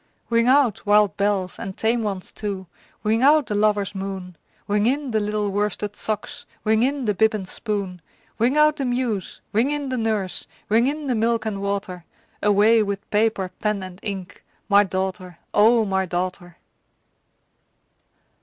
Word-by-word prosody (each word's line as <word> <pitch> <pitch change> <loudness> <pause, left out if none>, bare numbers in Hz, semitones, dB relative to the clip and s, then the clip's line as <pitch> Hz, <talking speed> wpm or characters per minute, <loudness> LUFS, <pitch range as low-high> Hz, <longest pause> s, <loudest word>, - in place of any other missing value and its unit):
Ring 230 +1 +3
out, 260 -4 +3
wild 210 -1 +4
bells, 200 -3 -1
and 190 -1 -6
tame 230 +2 +1
ones 195 -4 -4
too! 200 -3 -5 0.4
Ring 220 +2 +2
out 295 +2 +5
the 210 - -4
lover's 205 -1 +1
moon! 190 -2 -6 0.3
Ring 205 +1 +2
in 275 +1 0
the 220 - +2
little 210 -1 -1
worsted 205 0 -2
socks! 215 -1 -4 0.2
Ring 220 +1 +3
in 270 +1 0
the 210 - +2
bib 220 +2 +3
and 190 -3 -5
spoon! 195 -4 -3 0.4
Ring 250 +6 +2
out 300 0 +5
the 275 - -2
muse! 245 -6 -2
ring 230 +6 +3
in 290 -2 -2
the 255 -1 -1
nurse! 215 -4 -2 0.2
Ring 230 +4 +4
in 300 +1 -2
the 260 - 0
milk 230 0 +1
and 200 -3 -3
water! 200 -3 -3 0.4
Away 210 +2 +5
with 200 -1 -3
paper, 210 -3 +1
pen, 210 -2 0
and 185 0 -9
ink 190 -4 -6 0.2
My 205 -1 +6
daughter, 185 -2 -4 0.2
O 225 +2 +5
my 190 -1 0
daughter! 175 0 -4
210 Hz, 165 wpm, -23 LUFS, 195-230 Hz, 0.4 s, My